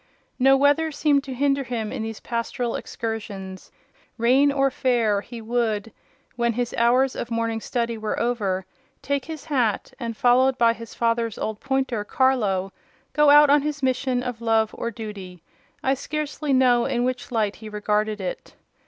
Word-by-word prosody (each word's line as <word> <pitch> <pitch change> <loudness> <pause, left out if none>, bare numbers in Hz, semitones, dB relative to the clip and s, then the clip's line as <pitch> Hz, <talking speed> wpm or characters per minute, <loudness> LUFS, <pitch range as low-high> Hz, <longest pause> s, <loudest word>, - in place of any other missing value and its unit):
No 270 +1 +6
weather 290 +3 +3
seemed 285 -1 +2
to 265 - -5
hinder 275 +1 +1
him 235 -4 -4
in 265 - -4
these 220 -1 -5
pastoral 235 0 -3
excursions: 200 -4 -6 0.5
rain 260 +5 +4
or 275 -1 +2
fair, 230 -6 +1
he 235 +2 -9
would, 225 -2 -1 0.4
when 235 -1 +1
his 245 +1 -2
hours 250 +3 +3
of 240 - -4
morning 230 -1 -1
study 235 -1 -2
were 215 0 -2
over, 205 -6 -1 0.4
take 280 -1 -1
his 320 -3 -8
hat, 250 -9 0
and, 230 -3 -4
followed 255 +1 +4
by 230 -2 +4
his 230 -1 -11
father's 230 -1 0
old 215 -1 -3
pointer, 265 -5 -1
Carlo, 205 -7 +1 0.4
go 300 -1 +5
out 295 0 +7
on 290 0 +5
his 300 0 -4
mission 255 -1 0
of 245 -2 -5
love 225 -1 +2
or 235 - -3
duty—I 205 +2 -6
scarcely 300 +1 -3
know 250 -2 +4
in 240 0 0
which 250 0 -3
light 215 -4 0
he 220 -1 -9
regarded 210 0 -1
it. 185 -2 -6
240 Hz, 160 wpm, -24 LUFS, 220-265 Hz, 0.5 s, out